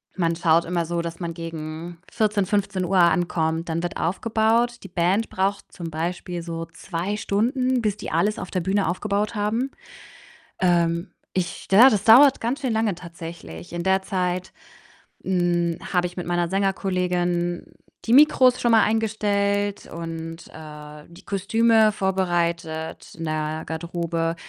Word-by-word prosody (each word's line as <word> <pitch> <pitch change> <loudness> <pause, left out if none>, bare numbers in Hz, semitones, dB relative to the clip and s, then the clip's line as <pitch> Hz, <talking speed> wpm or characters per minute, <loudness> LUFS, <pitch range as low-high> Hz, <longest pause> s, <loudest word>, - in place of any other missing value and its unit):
Man 170 -3 0
schaut 165 0 +3
immer 170 -1 -1
so, 170 +1 -2
dass 170 0 -6
man 170 -2 -4
gegen 165 +1 -7
14, 210 -2 +1
15:00 195 -2 0
ankommt, 170 -2 +2
dann 165 +1 -2
wird 175 - -3
aufgebaut. 225 +5 +1
Die - - -8
Band 185 +5 0
braucht 195 +1 -2
zum 170 -3 -7
Beispiel 175 +2 -4
so 165 -1 -5
2 175 +4 -4
Stunden, 250 +5 0
bis 210 -2 -1
die - - -7
alles 210 +1 +1
auf 180 - -6
der 185 - -1
Bühne 195 +3 0
aufgebaut 205 +4 -1
haben. 225 +6 -1 0.9
Ähm, 170 0 +1 0.2
ich 175 -2 -3
ja, 230 +7 +8
das 205 -3 0
dauert 260 +5 +7
ganz 245 +6 -2
schön 260 -4 -1
lange 220 -3 +1
tatsächlich. 165 - -10
In 175 0 -3
der 190 +1 +2
Zeit, 185 -1 -2 0.7
hm, 175 -2 +1 0.2
habe 180 -1 +2
ich 180 - -14
mit 175 - -4
meiner 175 -1 0
Sängerkollegin 180 -2 0 0.4
die 225 - -1
Mikros 255 -3 +6
schon 240 -1 +2
mal 220 - +6
eingestellt 205 -2 0
und, 165 0 -7
äh, 150 -1 -11
die 170 0 -16
Kostüme 220 +2 +3
vorbereitet 170 -4 -2
in 165 - -6
der 155 0 -2
Garderobe. 165 0 -2
180 Hz, 145 wpm, -23 LUFS, 170-205 Hz, 0.9 s, ja